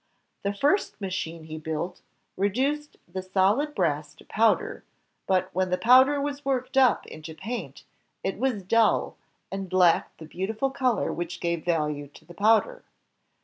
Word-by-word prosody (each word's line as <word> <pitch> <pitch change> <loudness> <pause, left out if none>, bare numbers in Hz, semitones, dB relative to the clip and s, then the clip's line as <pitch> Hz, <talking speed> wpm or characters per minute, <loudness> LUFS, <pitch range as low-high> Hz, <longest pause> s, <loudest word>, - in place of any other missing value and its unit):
The 200 - -1
first 285 - +1
machine 180 -4 -4
he 155 0 -7
built 160 +3 -4 0.3
re 200 +2 +1
duced 290 +7 -2
the 185 +2 -5
solid 200 +11 +1
brass 150 -5 -1
to - - -18
powder, 225 +1 +1 0.4
but 185 -1 +1
when 185 0 0
the 180 - +1
powder 260 +6 +6
was 285 0 -3
worked 265 -2 -2
up 265 -2 +4
into 155 0 -9
paint, 195 - -6 0.4
it 195 +1 -2
was 245 -6 0
dull, 225 +4 +2 0.4
and 195 -1 -5
lacked 180 -2 +3
the 160 - -10
beautiful 215 - -2
color 255 -5 0
which 175 0 -5
gave 170 -2 -1
value 150 -4 -1
to - - -16
the 175 - -13
powder. 225 - +2
195 Hz, 155 wpm, -26 LUFS, 170-255 Hz, 0.4 s, powder